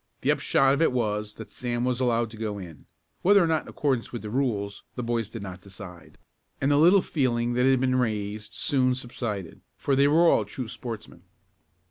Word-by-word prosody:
The -, -, +3 dB
upshot 135 Hz, 0 st, +3 dB
of 140 Hz, -, 0 dB
it 165 Hz, -, +4 dB
was 105 Hz, -3 st, -1 dB
that 110 Hz, -, -10 dB
Sam 120 Hz, -1 st, -2 dB
was 125 Hz, -1 st, 0 dB
allowed 120 Hz, -3 st, +1 dB
to -, -, -10 dB
go 105 Hz, -2 st, -3 dB
in, 85 Hz, -7 st, -10 dB, 0.3 s
whether 200 Hz, 0 st, +5 dB
or -, -, +3 dB
not 160 Hz, -1 st, +1 dB
in -, -, -18 dB
accordance 130 Hz, -5 st, -1 dB
with 120 Hz, -, -6 dB
the 105 Hz, -, -6 dB
rules 105 Hz, -6 st, -1 dB
the 125 Hz, -, -4 dB
boys 115 Hz, -2 st, -1 dB
did 110 Hz, -2 st, -7 dB
not 90 Hz, -2 st, -8 dB
decide, 95 Hz, -3 st, -12 dB, 0.4 s
and 135 Hz, +2 st, +1 dB
the 145 Hz, -, +4 dB
little 175 Hz, +5 st, +6 dB
feeling 120 Hz, -5 st, 0 dB
that 125 Hz, +2 st, +2 dB
had 135 Hz, -1 st, +4 dB
been 130 Hz, 0 st, +1 dB
raised 105 Hz, -3 st, -2 dB
soon 130 Hz, -2 st, +2 dB
subsided, 115 Hz, -7 st, -5 dB, 0.2 s
for 140 Hz, -, 0 dB
they 140 Hz, +1 st, +4 dB
were 165 Hz, +4 st, +5 dB
all 110 Hz, -, +4 dB
true 115 Hz, +4 st, -6 dB
sportsmen. 115 Hz, -1 st, -8 dB
120 Hz, 205 wpm, -26 LUFS, 105-135 Hz, 0.4 s, little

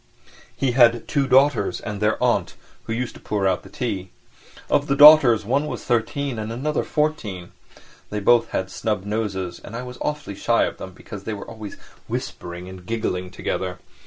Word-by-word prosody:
He 135 Hz, -2 st, +1 dB
had 120 Hz, -2 st, +4 dB
two 140 Hz, -2 st, +1 dB
daughters 135 Hz, -5 st, +3 dB
and 105 Hz, -1 st, -6 dB
their 105 Hz, +1 st, +2 dB
aunt, -, -, +1 dB, 0.3 s
who -, -, -6 dB
used 120 Hz, +2 st, -3 dB
to -, -, -14 dB
pour 100 Hz, -2 st, 0 dB
out 95 Hz, -2 st, +1 dB
the 95 Hz, -, -14 dB
tea. 100 Hz, -4 st, -4 dB, 0.6 s
Of 145 Hz, 0 st, +1 dB
the 140 Hz, -, +2 dB
daughters 145 Hz, -7 st, +8 dB
one 140 Hz, +7 st, +1 dB
was -, -, -5 dB
thirteen 120 Hz, +2 st, -1 dB
and 110 Hz, +1 st, -4 dB
another 145 Hz, +6 st, -1 dB
fourteen, 110 Hz, -, -2 dB, 0.6 s
they 105 Hz, -, -3 dB
both 120 Hz, +3 st, +4 dB
had 95 Hz, 0 st, -3 dB
snub 105 Hz, -3 st, -2 dB
noses, 100 Hz, -4 st, -3 dB
and 115 Hz, -, -9 dB
I 125 Hz, -, -4 dB
was 125 Hz, 0 st, -9 dB
awfully 150 Hz, -8 st, -3 dB
shy 115 Hz, +4 st, +2 dB
of -, -, -3 dB
them 95 Hz, -, -8 dB
because 100 Hz, +2 st, -10 dB
they 110 Hz, -, -3 dB
were 100 Hz, -, -9 dB
always 110 Hz, -2 st, -8 dB, 0.3 s
whispering 90 Hz, +1 st, -5 dB
and 95 Hz, -1 st, -10 dB
giggling 90 Hz, -3 st, -2 dB
together. 90 Hz, 0 st, -3 dB
110 Hz, 185 wpm, -23 LUFS, 95-125 Hz, 0.6 s, daughters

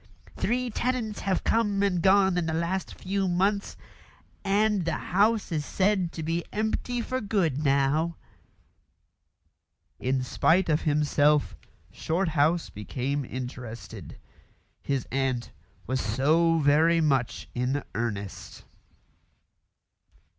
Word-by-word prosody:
Three 245 Hz, +1 st, -1 dB
tenants 235 Hz, -2 st, -2 dB
have 195 Hz, -1 st, -1 dB
come 205 Hz, -3 st, +1 dB
and 180 Hz, -4 st, +1 dB
gone 190 Hz, 0 st, +4 dB
in 175 Hz, -2 st, 0 dB
the 160 Hz, -, -1 dB
last 170 Hz, +3 st, -2 dB
few 195 Hz, +1 st, -1 dB
months, 195 Hz, +3 st, 0 dB, 0.7 s
and 205 Hz, 0 st, +2 dB
the 165 Hz, -, -1 dB
house 210 Hz, +2 st, +1 dB
is 155 Hz, -3 st, -1 dB
said 190 Hz, 0 st, +1 dB
to 160 Hz, -, -5 dB
be 165 Hz, +2 st, -1 dB
empty 220 Hz, +3 st, -1 dB
for 255 Hz, +2 st, -3 dB
good 170 Hz, -, 0 dB
now." 140 Hz, +4 st, +2 dB, 1.8 s
In 130 Hz, 0 st, 0 dB
spite 170 Hz, +7 st, +2 dB
of 155 Hz, 0 st, +2 dB
himself 150 Hz, 0 st, +2 dB, 0.4 s
Shorthouse 160 Hz, -1 st, 0 dB
became 130 Hz, +7 st, -3 dB
interested. 125 Hz, -2 st, -7 dB, 0.6 s
His 135 Hz, -2 st, -2 dB
aunt 130 Hz, -3 st, -1 dB, 0.3 s
was 130 Hz, +2 st, -1 dB
so 155 Hz, +9 st, +2 dB
very 160 Hz, +3 st, +4 dB
much 135 Hz, -6 st, 0 dB
in 130 Hz, +3 st, -1 dB
earnest. 100 Hz, -4 st, -5 dB
165 Hz, 110 wpm, -27 LUFS, 140-195 Hz, 1.8 s, gone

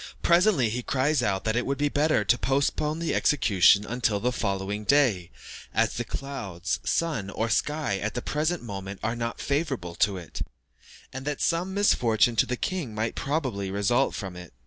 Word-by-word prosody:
Presently 170 Hz, -, +4 dB
he 125 Hz, +3 st, -2 dB
cries 140 Hz, +5 st, +1 dB
out 95 Hz, -2 st, 0 dB
that 110 Hz, 0 st, 0 dB
it 120 Hz, -, +1 dB
would 140 Hz, 0 st, -2 dB
be 145 Hz, -, +1 dB
better 145 Hz, -4 st, +2 dB
to 120 Hz, -, +3 dB
postpone 140 Hz, +3 st, 0 dB
the 165 Hz, 0 st, -2 dB
execution 105 Hz, -, +4 dB
until 110 Hz, -3 st, 0 dB
the 125 Hz, +4 st, 0 dB
following 100 Hz, -3 st, -2 dB
day, 110 Hz, -10 st, +3 dB, 0.5 s
as -, -, +2 dB
the -, -, -2 dB
clouds, 100 Hz, -11 st, -4 dB
sun, 150 Hz, -13 st, -1 dB
or 115 Hz, +3 st, -2 dB
sky 150 Hz, -5 st, 0 dB
at 110 Hz, +2 st, -3 dB
the 125 Hz, -, -2 dB
present 155 Hz, +1 st, -1 dB
moment 95 Hz, -3 st, -6 dB
are 115 Hz, +2 st, -1 dB
not 115 Hz, 0 st, -4 dB
favourable 140 Hz, -, -2 dB
to 100 Hz, +2 st, +1 dB
it, 85 Hz, -2 st, -8 dB, 0.7 s
and 130 Hz, 0 st, -6 dB
that 150 Hz, -1 st, -2 dB
some 180 Hz, +3 st, 0 dB
misfortune 120 Hz, -, +3 dB
to -, -, +4 dB
the 125 Hz, -, -2 dB
king 160 Hz, -, -3 dB
might 110 Hz, +1 st, -1 dB
probably 130 Hz, -10 st, -2 dB
result 100 Hz, +7 st, +1 dB
from 95 Hz, -4 st, -6 dB
it. 90 Hz, -5 st, -11 dB
120 Hz, 180 wpm, -26 LUFS, 100-145 Hz, 0.7 s, Presently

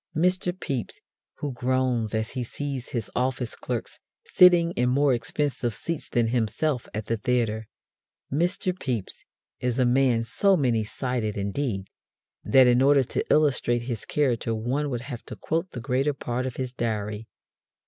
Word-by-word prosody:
Mr. 180 Hz, +2 st, +2 dB
Pepys 140 Hz, -9 st, -4 dB, 0.4 s
who 145 Hz, -, -4 dB
groans 125 Hz, -3 st, 0 dB
as 110 Hz, +1 st, -1 dB
he 125 Hz, -, -3 dB
sees 135 Hz, +1 st, -5 dB
his 115 Hz, -4 st, -4 dB
office 125 Hz, -1 st, -1 dB
clerks -, -, -5 dB, 0.3 s
sitting 175 Hz, -2 st, +6 dB
in 125 Hz, -6 st, +1 dB
more 140 Hz, +1 st, +3 dB
expensive 120 Hz, -1 st, -1 dB
seats 165 Hz, -, -4 dB
than 115 Hz, -2 st, +1 dB
himself 120 Hz, +4 st, 0 dB
at 110 Hz, 0 st, -4 dB
the 115 Hz, -, -1 dB
theatre. 110 Hz, -1 st, 0 dB, 0.7 s
Mr. 180 Hz, +4 st, +1 dB
Pepys 125 Hz, -, -4 dB, 0.3 s
is 125 Hz, -1 st, -1 dB
a 130 Hz, -, +3 dB
man 125 Hz, -2 st, +3 dB
so 190 Hz, -, +3 dB
many 120 Hz, -7 st, +2 dB
sided, 115 Hz, -1 st, -2 dB
indeed, 100 Hz, 0 st, -2 dB, 0.6 s
that 130 Hz, -1 st, +6 dB
in 125 Hz, 0 st, +4 dB
order 140 Hz, 0 st, +5 dB
to -, -, -2 dB
illustrate 125 Hz, -5 st, +3 dB
his 120 Hz, -4 st, -4 dB
character 120 Hz, -6 st, 0 dB
one 130 Hz, +7 st, -1 dB
would 120 Hz, -3 st, -3 dB
have 125 Hz, -2 st, -7 dB
to -, -, -9 dB
quote 165 Hz, +3 st, -2 dB
the 125 Hz, -, -7 dB
greater 135 Hz, +4 st, 0 dB
part 125 Hz, 0 st, -2 dB
of 125 Hz, -, -5 dB
his 130 Hz, -1 st, -4 dB
Diary. 110 Hz, -2 st, -3 dB
125 Hz, 160 wpm, -26 LUFS, 115-140 Hz, 0.7 s, sitting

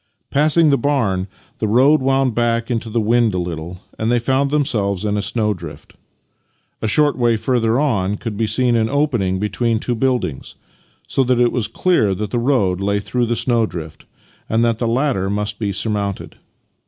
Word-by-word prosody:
Passing 155 Hz, +2 st, +4 dB
the 140 Hz, -, +2 dB
barn, 110 Hz, -9 st, 0 dB, 0.3 s
the 110 Hz, -, 0 dB
road 135 Hz, +8 st, +4 dB
wound 135 Hz, -1 st, +1 dB
back 115 Hz, 0 st, 0 dB
into 115 Hz, -1 st, -2 dB
the 115 Hz, +2 st, 0 dB
wind 115 Hz, -1 st, +2 dB
a -, -, 0 dB
Uttle, 85 Hz, 0 st, -5 dB, 0.2 s
and 110 Hz, +1 st, 0 dB
they 120 Hz, -, +3 dB
found 135 Hz, +4 st, +1 dB
themselves 110 Hz, -10 st, -1 dB
in 105 Hz, 0 st, 0 dB
a 105 Hz, -, 0 dB
snowdrift. 100 Hz, -6 st, -3 dB, 0.9 s
A 110 Hz, -, -1 dB
short 145 Hz, +5 st, +3 dB
way 120 Hz, -2 st, +2 dB
further 115 Hz, 0 st, +1 dB
on 105 Hz, -9 st, 0 dB
could 115 Hz, -1 st, -5 dB
be 110 Hz, +1 st, -1 dB
seen 120 Hz, +3 st, +1 dB
an 110 Hz, -1 st, +1 dB
opening 125 Hz, -10 st, 0 dB
between 110 Hz, +3 st, -1 dB
two 120 Hz, -, -2 dB
buildings, 120 Hz, -, -2 dB, 0.5 s
so 135 Hz, -, +1 dB
that 125 Hz, -1 st, +1 dB
it 120 Hz, -1 st, +3 dB
was 120 Hz, -4 st, 0 dB
clear 110 Hz, -, +1 dB
that 105 Hz, +1 st, -4 dB
the 120 Hz, -, 0 dB
road 105 Hz, -8 st, +1 dB
lay 100 Hz, +1 st, 0 dB
through 120 Hz, +4 st, -1 dB
the 120 Hz, -, 0 dB
snowdrift, 105 Hz, -11 st, -2 dB, 0.4 s
and 115 Hz, +1 st, +2 dB
that 115 Hz, -1 st, 0 dB
the 120 Hz, -, 0 dB
latter 120 Hz, -5 st, 0 dB
must 105 Hz, +1 st, -2 dB
be 105 Hz, -3 st, -1 dB
surmounted. 100 Hz, 0 st, -3 dB
115 Hz, 180 wpm, -19 LUFS, 100-125 Hz, 0.9 s, Passing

